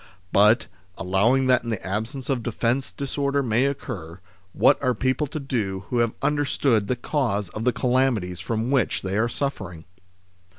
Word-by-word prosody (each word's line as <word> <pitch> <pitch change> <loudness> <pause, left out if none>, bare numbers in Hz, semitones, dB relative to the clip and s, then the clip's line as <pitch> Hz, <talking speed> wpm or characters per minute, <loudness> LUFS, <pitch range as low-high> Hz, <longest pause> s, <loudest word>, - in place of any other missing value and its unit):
But, 105 +4 +5 0.3
allowing 100 +9 +2
that 125 -2 +3
in 120 - -5
the 110 -4 -3
absence 110 +7 -4
of 130 -3 0
defence 120 +3 -1
disorder 140 0 -1
may 120 +2 +2
occur, 90 - -6 0.3
what 140 - +3
are 130 -3 +1
people 130 +5 0
to 155 - -5
do 105 -8 -3
who 120 - +1
have 115 -1 +1
understood 140 -7 +1
the 125 - 0
cause 120 -7 -1
of 110 +2 -5
the 125 - +4
calamities 120 -7 0
from 115 +5 -2
which 135 -5 +1
they 95 0 -2
are 115 +3 +2
suffering 100 - -4
120 Hz, 165 wpm, -24 LUFS, 105-135 Hz, 0.3 s, But